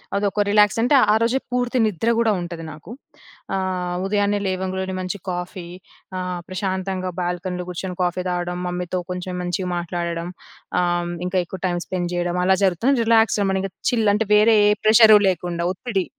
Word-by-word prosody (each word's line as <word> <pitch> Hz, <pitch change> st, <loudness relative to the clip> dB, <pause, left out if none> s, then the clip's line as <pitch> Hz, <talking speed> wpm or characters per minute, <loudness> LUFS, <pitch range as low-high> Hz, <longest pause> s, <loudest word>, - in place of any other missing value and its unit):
అదొక 205 Hz, +1 st, +1 dB
రిలాక్స్. 210 Hz, +1 st, +4 dB
అంటే 255 Hz, +4 st, +4 dB, 0.2 s
ఆ -, -, +4 dB
రోజే 245 Hz, +3 st, +1 dB
పూర్తి 250 Hz, 0 st, 0 dB
నిద్ర 215 Hz, +3 st, -1 dB
గూడా 225 Hz, -2 st, +3 dB
ఉం‌టది 170 Hz, -1 st, -6 dB
నాకు. 155 Hz, +8 st, -12 dB, 0.6 s
ఆహ్, 185 Hz, -2 st, -2 dB
ఉదయాన్నే 205 Hz, 0 st, +1 dB
లేవంగులో‌నే 190 Hz, 0 st, -3 dB
మంచి 185 Hz, +2 st, -4 dB
కాఫీ 180 Hz, 0 st, -5 dB, 0.5 s
ఆహ్, 180 Hz, -1 st, -3 dB
ప్రశాంతంగా 185 Hz, -1 st, -3 dB
బాల్కనీలో 180 Hz, 0 st, -3 dB
గూర్చొని 180 Hz, +1 st, -5 dB
కాఫీ 180 Hz, +1 st, -1 dB
తాగడం. 175 Hz, 0 st, -2 dB
మమ్మీతో 180 Hz, 0 st, -3 dB
కొంచెం 180 Hz, 0 st, -5 dB
మంచిగా 180 Hz, +1 st, -2 dB
మాట్లాడడం. 170 Hz, 0 st, -3 dB, 0.5 s
ఆహ్, 175 Hz, 0 st, -1 dB
ఇంకా 185 Hz, +1 st, 0 dB
ఎక్కువ 185 Hz, +1 st, -9 dB
టైమ్ 175 Hz, -1 st, -2 dB
స్పెండ్ 180 Hz, -1 st, -3 dB
చేయడం. 175 Hz, 0 st, -1 dB
అలా 190 Hz, 0 st, +4 dB
జరుగుతుంది. 235 Hz, +9 st, +2 dB
రిలాక్స్‌గా 225 Hz, -2 st, +3 dB
మనం 190 Hz, -, 0 dB
ఇంకా 195 Hz, -2 st, -5 dB, 0.2 s
చిల్ 225 Hz, -3 st, +2 dB
అంటే 220 Hz, 0 st, -1 dB
వేరే 220 Hz, +1 st, +5 dB
ఏ -, -, +5 dB, 0.2 s
ప్రెజరు 215 Hz, -1 st, +8 dB
లేకుండా. 170 Hz, -1 st, -2 dB
ఒత్తిడి. 195 Hz, -2 st, -2 dB
185 Hz, 160 wpm, -22 LUFS, 175-205 Hz, 0.6 s, ప్రెజరు